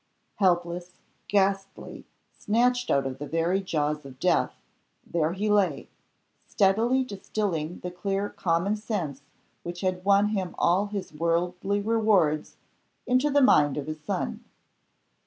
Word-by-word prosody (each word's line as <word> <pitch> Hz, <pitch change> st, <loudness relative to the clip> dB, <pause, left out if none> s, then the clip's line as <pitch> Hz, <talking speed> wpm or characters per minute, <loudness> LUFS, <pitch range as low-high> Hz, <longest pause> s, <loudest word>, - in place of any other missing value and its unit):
Helpless, 175 Hz, -1 st, 0 dB, 0.3 s
ghastly, 195 Hz, -1 st, -1 dB, 0.3 s
snatched 245 Hz, +3 st, +1 dB
out 140 Hz, -1 st, +2 dB
of 135 Hz, 0 st, -5 dB
the 145 Hz, -, -5 dB
very 170 Hz, +5 st, 0 dB
jaws 150 Hz, -4 st, -1 dB
of 130 Hz, -2 st, -12 dB
death, -, -, +1 dB, 0.5 s
there 165 Hz, -1 st, 0 dB
he 205 Hz, +3 st, -2 dB
lay, 195 Hz, -9 st, +1 dB, 0.6 s
steadily 225 Hz, +7 st, +2 dB
distilling 195 Hz, -7 st, -3 dB
the 180 Hz, -, -5 dB
clear 195 Hz, +2 st, -2 dB
common 175 Hz, +4 st, 0 dB
sense 185 Hz, -, -4 dB, 0.4 s
which 175 Hz, 0 st, -7 dB
had 185 Hz, -1 st, -1 dB
won 200 Hz, +1 st, +4 dB
him 190 Hz, -4 st, -3 dB
all 190 Hz, +4 st, +2 dB
his 200 Hz, -5 st, -6 dB
worldly 175 Hz, +5 st, 0 dB
rewards 205 Hz, -8 st, +2 dB, 0.5 s
into 255 Hz, +4 st, +2 dB
the 285 Hz, -1 st, +4 dB
mind 145 Hz, -, +4 dB
of 145 Hz, -, -3 dB
his 155 Hz, 0 st, -6 dB
son. -, -, -3 dB
185 Hz, 130 wpm, -26 LUFS, 165-205 Hz, 0.6 s, won